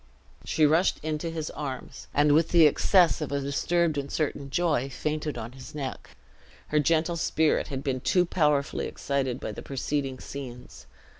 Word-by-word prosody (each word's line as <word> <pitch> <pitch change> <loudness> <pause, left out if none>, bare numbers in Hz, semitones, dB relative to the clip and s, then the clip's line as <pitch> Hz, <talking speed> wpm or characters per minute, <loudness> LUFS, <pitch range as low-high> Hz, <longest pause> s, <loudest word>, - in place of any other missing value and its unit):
She 155 - +2
rushed 160 +5 +3
into 155 +1 -2
his 160 -2 -4
arms, 135 -4 -6
and 145 +1 +3
with 160 +2 +3
the 170 -2 +6
excess 170 +3 +4
of 150 - -3
a 140 - 0
disturbed 155 +3 0
and 140 - -3
uncertain 140 -1 -2
joy, 150 -4 +1
fainted 150 0 -3
on 115 0 -6
his 130 +2 -11
neck. 135 -3 -6 0.5
Her 150 - +3
gentle 165 +3 +2
spirit 160 -1 +1
had 135 -1 -5
been 130 -2 -1
too 180 +7 +2
powerfully 150 -5 +1
excited 135 -3 -2
by - - -4
the - - -8
preceding 135 0 -2
scenes. 125 -3 -9
150 Hz, 165 wpm, -27 LUFS, 135-160 Hz, 0.5 s, the